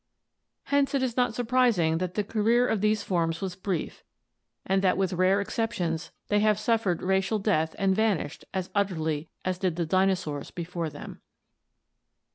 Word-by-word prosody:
Hence 280 Hz, 0 st, +1 dB
it 270 Hz, -, +1 dB
is 245 Hz, -3 st, -1 dB
not 245 Hz, -3 st, +1 dB
surprising 235 Hz, -10 st, +2 dB
that 180 Hz, 0 st, -3 dB
the 210 Hz, -, +1 dB
career 225 Hz, +4 st, +2 dB
of 220 Hz, -3 st, 0 dB
these 215 Hz, -1 st, +2 dB
forms 165 Hz, -3 st, 0 dB
was 190 Hz, -2 st, -4 dB
brief 185 Hz, -3 st, -4 dB, 0.6 s
and 190 Hz, 0 st, +2 dB
that 185 Hz, -2 st, +2 dB
with 190 Hz, -1 st, 0 dB
rare 185 Hz, +2 st, +3 dB
exceptions 200 Hz, -6 st, -2 dB, 0.2 s
they 205 Hz, -, +2 dB
have 210 Hz, 0 st, +3 dB
suffered 215 Hz, -5 st, 0 dB
racial 190 Hz, +3 st, +1 dB
death 160 Hz, -6 st, 0 dB
and 195 Hz, -1 st, +2 dB
vanished 200 Hz, -9 st, 0 dB
as 190 Hz, -1 st, -3 dB
utterly 160 Hz, -6 st, -1 dB, 0.2 s
as 185 Hz, -1 st, -1 dB
did 185 Hz, -4 st, 0 dB
the 170 Hz, -1 st, -1 dB
dinosaurs 185 Hz, -4 st, 0 dB
before 170 Hz, -1 st, -4 dB
them. -, -, -10 dB
190 Hz, 160 wpm, -27 LUFS, 175-215 Hz, 0.6 s, rare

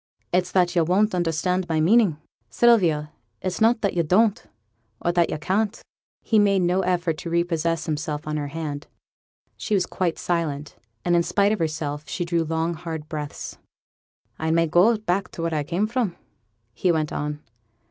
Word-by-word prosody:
It's 180 Hz, 0 st, +1 dB
that 180 Hz, -1 st, +2 dB
yo' 170 Hz, -, +4 dB
won't 195 Hz, +6 st, +2 dB
understand 175 Hz, +1 st, 0 dB
my 160 Hz, -1 st, +1 dB
meaning, 190 Hz, 0 st, +4 dB, 0.3 s
Sylvia; 170 Hz, -11 st, +3 dB, 0.3 s
it's 185 Hz, +3 st, -4 dB
not 225 Hz, +1 st, +4 dB
that 200 Hz, -, 0 dB
yo' 175 Hz, -, +2 dB
don't, 200 Hz, +6 st, +2 dB, 0.6 s
or 175 Hz, -, 0 dB
that 170 Hz, -1 st, +2 dB
yo' -, -, -2 dB
can't.' 200 Hz, +7 st, -1 dB, 0.4 s
He 220 Hz, -, +3 dB
made 200 Hz, -2 st, +3 dB
no 180 Hz, +2 st, +2 dB
effort 175 Hz, -3 st, 0 dB
to 170 Hz, -, -5 dB
repossess 165 Hz, -1 st, 0 dB
himself 155 Hz, -1 st, -3 dB
of 155 Hz, -, -2 dB
her 145 Hz, -1 st, -2 dB
hand. 150 Hz, -1 st, -5 dB, 0.7 s
She 215 Hz, -, -1 dB
was 185 Hz, -2 st, +2 dB
quite 175 Hz, -3 st, -2 dB
silent, 150 Hz, -4 st, -2 dB, 0.3 s
but 175 Hz, -, +1 dB
in 170 Hz, -, +5 dB
spite 200 Hz, +4 st, +2 dB
of 215 Hz, -, 0 dB
herself 155 Hz, -2 st, -3 dB
she 175 Hz, -, -2 dB
drew 170 Hz, -1 st, +1 dB
long 160 Hz, +1 st, -1 dB
hard 160 Hz, -2 st, -6 dB
breaths. 150 Hz, -2 st, -6 dB, 0.8 s
'I 160 Hz, -, -1 dB
may 165 Hz, +1 st, +3 dB
go 180 Hz, +8 st, +4 dB
back 195 Hz, -2 st, -1 dB
to 165 Hz, -, -5 dB
where 165 Hz, -1 st, -1 dB
I 150 Hz, -, +1 dB
came 175 Hz, +8 st, -1 dB
from,' 220 Hz, -5 st, -1 dB, 0.6 s
he 180 Hz, -, +1 dB
went 155 Hz, -2 st, -1 dB
on. 150 Hz, 0 st, -4 dB
170 Hz, 180 wpm, -24 LUFS, 155-185 Hz, 0.8 s, in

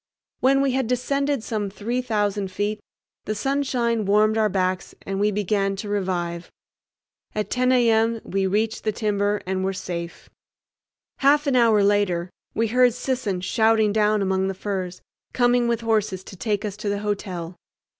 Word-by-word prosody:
When 270 Hz, +1 st, +4 dB
we 275 Hz, -1 st, +2 dB
had 260 Hz, -2 st, 0 dB
descended 275 Hz, +1 st, 0 dB
some 210 Hz, -3 st, -2 dB
three 230 Hz, +5 st, -2 dB
thousand 205 Hz, -4 st, -1 dB
feet 205 Hz, +2 st, -2 dB, 0.5 s
the 215 Hz, -, -2 dB
sunshine 245 Hz, -2 st, 0 dB
warmed 210 Hz, +2 st, +3 dB
our 220 Hz, -1 st, +2 dB
backs 185 Hz, -1 st, -1 dB
and 195 Hz, 0 st, -3 dB
we 205 Hz, +1 st, +3 dB
began 200 Hz, -1 st, 0 dB
to 200 Hz, +2 st, -6 dB
revive. 180 Hz, -4 st, -2 dB, 0.9 s
At 210 Hz, 0 st, -2 dB
10 255 Hz, 0 st, +2 dB
a.m. 230 Hz, -2 st, +3 dB
we 195 Hz, 0 st, -1 dB
reached 215 Hz, +3 st, -1 dB
the 215 Hz, -, +1 dB
timber 205 Hz, -1 st, 0 dB
and 190 Hz, 0 st, -2 dB
were 190 Hz, +1 st, 0 dB
safe. 170 Hz, -2 st, -6 dB, 0.9 s
Half 290 Hz, +2 st, +4 dB
an 275 Hz, -2 st, +1 dB
hour 225 Hz, -4 st, +5 dB
later 190 Hz, -4 st, +1 dB, 0.2 s
we 225 Hz, 0 st, +1 dB
heard 250 Hz, 0 st, +4 dB
Sisson 250 Hz, -8 st, -2 dB
shouting 220 Hz, +1 st, +2 dB
down 210 Hz, -1 st, +2 dB
among 190 Hz, 0 st, +1 dB
the 195 Hz, -, -3 dB
firs, 185 Hz, -2 st, -4 dB, 0.3 s
coming 245 Hz, -1 st, +3 dB
with 235 Hz, -1 st, 0 dB
horses 215 Hz, -5 st, 0 dB
to 190 Hz, -, -11 dB
take 205 Hz, +2 st, -2 dB
us 205 Hz, -2 st, -4 dB
to 210 Hz, -1 st, -3 dB
the 200 Hz, 0 st, -1 dB
hotel. 185 Hz, -4 st, -3 dB
210 Hz, 165 wpm, -23 LUFS, 195-235 Hz, 0.9 s, hour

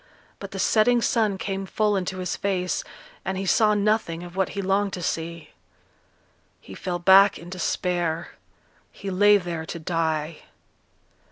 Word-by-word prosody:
But -, -, -7 dB
the -, -, -8 dB
setting 240 Hz, +2 st, +3 dB
sun 220 Hz, -4 st, +1 dB
came 195 Hz, 0 st, -4 dB
full 210 Hz, 0 st, +1 dB
into 185 Hz, 0 st, -2 dB
his 180 Hz, -2 st, -3 dB
face, 185 Hz, -2 st, -1 dB, 0.4 s
and 190 Hz, 0 st, -3 dB
he 195 Hz, -, -3 dB
saw 210 Hz, +2 st, +3 dB
nothing 205 Hz, -5 st, 0 dB
of 175 Hz, 0 st, -10 dB
what 190 Hz, -1 st, 0 dB
he -, -, 0 dB
longed 195 Hz, +1 st, +1 dB
to 180 Hz, -, -5 dB
see. 165 Hz, 0 st, -4 dB, 1.1 s
He 95 Hz, -, -12 dB
fell 175 Hz, -, -3 dB
back 190 Hz, +3 st, +6 dB
in 170 Hz, +1 st, -11 dB
despair; 175 Hz, -2 st, -1 dB, 0.6 s
he 195 Hz, -1 st, -6 dB
lay 205 Hz, +2 st, +5 dB
there 175 Hz, -4 st, -4 dB
to 170 Hz, -, -5 dB
die. 160 Hz, -2 st, -2 dB
185 Hz, 155 wpm, -24 LUFS, 170-200 Hz, 1.1 s, back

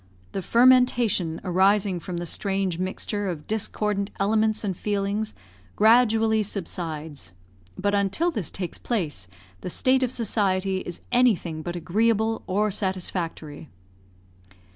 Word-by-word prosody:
The 195 Hz, -, -3 dB
fermentation 240 Hz, -8 st, +3 dB
arising 190 Hz, +1 st, +2 dB
from 175 Hz, +1 st, -6 dB
the 175 Hz, -, -3 dB
strange 190 Hz, 0 st, -1 dB
mixture 195 Hz, +2 st, -2 dB
of 160 Hz, -4 st, -5 dB
discordant 210 Hz, -1 st, -2 dB
elements 215 Hz, +2 st, +1 dB
and 195 Hz, -3 st, -1 dB
feelings 205 Hz, +2 st, -2 dB, 0.4 s
gradually 225 Hz, -1 st, +4 dB
subsides, 160 Hz, -, -4 dB, 0.4 s
but 200 Hz, +2 st, 0 dB
until 200 Hz, -, +1 dB
this 210 Hz, -, -4 dB
takes 180 Hz, -3 st, -5 dB
place, 155 Hz, -, -2 dB, 0.3 s
the -, -, -5 dB
state 260 Hz, +8 st, +2 dB
of 255 Hz, -2 st, 0 dB
society 195 Hz, -5 st, 0 dB
is 175 Hz, -2 st, -7 dB
anything 210 Hz, -10 st, +2 dB
but 175 Hz, +2 st, -5 dB
agreeable 220 Hz, +5 st, +1 dB
or 210 Hz, +3 st, +1 dB
satisfactory. 175 Hz, -6 st, -4 dB
200 Hz, 120 wpm, -25 LUFS, 175-220 Hz, 0.4 s, gradually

